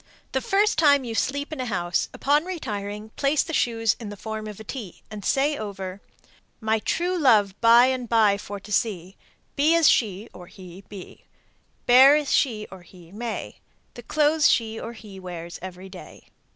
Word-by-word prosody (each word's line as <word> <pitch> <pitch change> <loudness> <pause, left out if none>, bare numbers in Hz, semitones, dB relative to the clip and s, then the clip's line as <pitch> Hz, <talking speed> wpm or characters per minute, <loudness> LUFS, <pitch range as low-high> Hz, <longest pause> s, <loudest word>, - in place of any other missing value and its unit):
The 265 - -1
first 405 +6 +1
time 285 -4 +5
you 235 -2 -5
sleep 285 +6 -2
in 305 - -7
a 255 - -3
house, 175 -5 -1
upon 290 +2 +1
retiring 215 - -6
place 280 +1 +2
the 325 - -7
shoes 225 -5 +1
in 225 -3 -7
the 205 - -9
form 220 +1 -6
of 210 -1 -9
a - - -8
T, 215 -5 -8
and 210 -2 -8
say 285 +7 +1
over, 195 -4 -6 0.6
My 220 0 0
true 350 +10 -1
love 220 - +3
by 235 +1 +7
and 255 -2 -2
by 215 -3 +3
for 205 0 -7
to 210 - -12
see, 190 -3 -1 0.4
Be 305 +4 +3
as 330 -3 +4
she 210 -1 +1
(or 180 -1 -12
he) 185 0 -13
be, 200 -3 -11 0.6
Bear 265 +4 +7
as 300 -2 0
she 220 -6 +1
(or 190 -1 -11
he) 175 -1 -17
may, 225 +2 -6 0.4
The 240 - -10
clothes 300 +4 +2
she 225 -1 0
(or 235 - -7
he) 210 -4 -12
wears 175 -2 -8
every 185 +1 -9
day. 190 -1 -13
220 Hz, 185 wpm, -24 LUFS, 195-275 Hz, 0.6 s, by